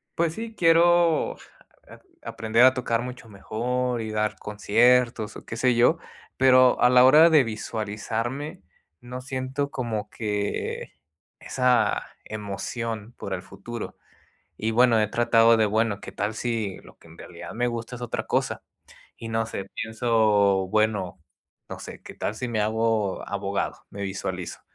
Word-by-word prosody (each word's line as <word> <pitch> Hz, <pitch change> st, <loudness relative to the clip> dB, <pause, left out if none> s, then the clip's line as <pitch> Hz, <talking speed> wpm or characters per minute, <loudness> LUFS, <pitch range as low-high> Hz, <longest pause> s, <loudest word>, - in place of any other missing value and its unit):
pues 165 Hz, -1 st, 0 dB
sí, 225 Hz, 0 st, -6 dB
quiero, 170 Hz, -1 st, +4 dB
ja -, -, -19 dB, 0.2 s
a -, -, -6 dB
aprender 115 Hz, +2 st, +2 dB
a 130 Hz, -, +6 dB
tocar 115 Hz, -2 st, -1 dB
mucho 125 Hz, -2 st, -8 dB
mejor 120 Hz, +4 st, -2 dB
y 110 Hz, -, -5 dB
dar 105 Hz, -1 st, -1 dB
conciertos 115 Hz, +2 st, +2 dB
o -, -, -13 dB
¿qué 115 Hz, -, -6 dB
sé 125 Hz, +1 st, +2 dB
yo? 120 Hz, +8 st, +4 dB, 0.4 s
Pero 130 Hz, -1 st, +5 dB
a 125 Hz, -, +6 dB
la 125 Hz, 0 st, +7 dB
hora 155 Hz, +5 st, +8 dB
de 155 Hz, -4 st, +6 dB
visualizarme 110 Hz, +3 st, -4 dB, 0.4 s
no 125 Hz, +1 st, -7 dB
siento 130 Hz, +2 st, -3 dB
como 115 Hz, -6 st, -4 dB
que 105 Hz, -2 st, -3 dB, 0.5 s
esa 125 Hz, -1 st, +1 dB, 0.2 s
emoción 110 Hz, +2 st, -5 dB
por 100 Hz, -, -5 dB
el 90 Hz, -, -8 dB
futuro 120 Hz, +3 st, -8 dB, 0.6 s
y 110 Hz, +1 st, -1 dB
bueno, 120 Hz, -1 st, +4 dB
he 105 Hz, -, +1 dB
tratado 115 Hz, 0 st, +4 dB
de 110 Hz, -, +3 dB
bueno, 110 Hz, -1 st, 0 dB
¿qué -, -, -9 dB
tal 105 Hz, +2 st, -2 dB
si 115 Hz, -5 st, -2 dB
lo -, -, -17 dB
que -, -, -19 dB
en 80 Hz, -, -15 dB
realidad 85 Hz, -, -9 dB
me 120 Hz, +2 st, 0 dB
gusta 120 Hz, +1 st, -4 dB
es 125 Hz, -, -10 dB
otra 120 Hz, -, -4 dB
cosa? -, -, -1 dB, 0.6 s
Y 115 Hz, -, -7 dB
no 115 Hz, 0 st, 0 dB
sé, 100 Hz, -3 st, -6 dB
pienso 110 Hz, -4 st, +2 dB
bueno, 105 Hz, -4 st, 0 dB, 0.5 s
no -, -, -7 dB
sé, -, -, -10 dB
¿qué -, -, -11 dB
tal 105 Hz, -, -3 dB
si 125 Hz, +2 st, -4 dB
me 110 Hz, -2 st, -1 dB
hago 110 Hz, -2 st, 0 dB
abogado? -, -, -3 dB
Me 100 Hz, -, -9 dB
visualizo. 95 Hz, -2 st, -5 dB
115 Hz, 160 wpm, -25 LUFS, 105-125 Hz, 0.6 s, hora